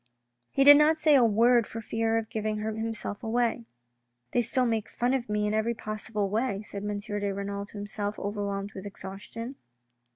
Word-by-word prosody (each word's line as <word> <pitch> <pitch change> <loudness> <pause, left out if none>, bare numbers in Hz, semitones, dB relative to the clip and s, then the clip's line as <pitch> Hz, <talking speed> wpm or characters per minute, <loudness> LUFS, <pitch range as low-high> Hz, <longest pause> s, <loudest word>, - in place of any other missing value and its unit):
He 275 - +2
did 290 +1 +10
not 305 +2 +5
say 310 -1 +4
a 265 -3 +6
word 230 +1 +4
for 225 - -6
fear 225 +1 0
of 225 -1 -3
giving 215 -1 -2
himself 220 0 -3
away. 230 - 0 0.3
" 120 0 -50
They 245 - +3
still 250 +2 +2
make 225 -2 -1
fun 245 +2 0
of 245 -4 -1
me 210 0 0
in 210 - 0
every 220 +2 +1
possible 215 -1 -3
way," 215 0 -1
said 200 -1 -7
M. 205 0 -2
de 205 -1 -3
Renal 200 +1 -4
to 205 - -11
himself, 205 0 -4
overwhelmed 200 0 -3
with 190 +1 -7
exhaustion. 205 +6 -8
215 Hz, 190 wpm, -28 LUFS, 205-235 Hz, 0.3 s, did